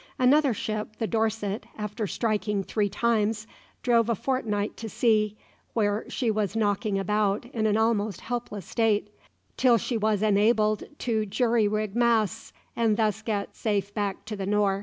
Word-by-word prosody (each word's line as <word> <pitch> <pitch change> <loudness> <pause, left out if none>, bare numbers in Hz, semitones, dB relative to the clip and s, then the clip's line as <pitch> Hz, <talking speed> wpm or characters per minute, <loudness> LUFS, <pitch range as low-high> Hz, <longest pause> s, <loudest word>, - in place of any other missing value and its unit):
Another 275 +2 +4
ship, 215 0 -3
the 225 - -1
"Dorset," 220 -2 -1
after 210 0 -3
striking 210 -2 -1
three 205 +1 0
times, 215 0 0 0.4
drove 235 -2 +3
a 230 - +2
fortnight 210 -4 -1
to 225 - -6
sea, 215 -2 +2 0.4
where 210 -1 0
she 240 -4 0
was 210 -1 -1
knocking 205 -1 +1
about 205 +2 0
in 220 -2 +1
an 210 0 +2
almost 220 -3 +1
helpless 230 -6 -4
state, 210 -2 +1 0.5
till 245 -3 +5
she 230 +2 -2
was 215 -1 +1
enabled 215 0 +3
to 230 -3 0
rig 215 -2 -2
jury 230 -1 +2 0.2
masts 230 -2 +1 0.2
and 225 -3 +2
thus 220 -1 +1
get 210 -3 -3
safe 205 -2 -1
back 205 -2 -3
to 215 -1 -5
the 195 -1 -4
Nore. 200 -1 +2
215 Hz, 160 wpm, -27 LUFS, 205-230 Hz, 0.5 s, till